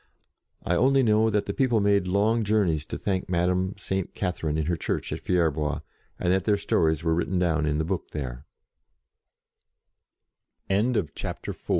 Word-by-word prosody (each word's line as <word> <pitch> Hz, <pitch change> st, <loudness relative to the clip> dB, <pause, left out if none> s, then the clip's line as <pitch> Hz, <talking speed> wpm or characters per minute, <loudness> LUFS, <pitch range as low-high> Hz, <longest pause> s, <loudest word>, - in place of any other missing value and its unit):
I 85 Hz, -, 0 dB
only 135 Hz, +8 st, +4 dB
know 110 Hz, -1 st, +3 dB
that 105 Hz, -1 st, 0 dB
the -, -, -3 dB
people 125 Hz, -5 st, +2 dB
made 100 Hz, -2 st, +2 dB
long 105 Hz, +5 st, +2 dB
journeys 95 Hz, -8 st, +1 dB
to -, -, -4 dB
thank 95 Hz, -2 st, -2 dB
Madame 90 Hz, +2 st, +1 dB
Saint 95 Hz, -1 st, -3 dB
Catherine 85 Hz, -5 st, -2 dB
in 80 Hz, -, 0 dB
her 85 Hz, +2 st, 0 dB
church -, -, -3 dB
at -, -, -4 dB
Fierbois, 80 Hz, -4 st, 0 dB, 0.4 s
and 90 Hz, -, +1 dB
that 95 Hz, 0 st, 0 dB
their 105 Hz, -2 st, +3 dB
stories 80 Hz, -5 st, +1 dB
were 80 Hz, -1 st, +2 dB
written 85 Hz, +2 st, 0 dB
down 80 Hz, -4 st, +1 dB
in 75 Hz, 0 st, +1 dB
the 80 Hz, -, 0 dB
book 90 Hz, +1 st, -3 dB
t 75 Hz, -4 st, -4 dB
90 Hz, 155 wpm, -26 LUFS, 80-100 Hz, 0.4 s, only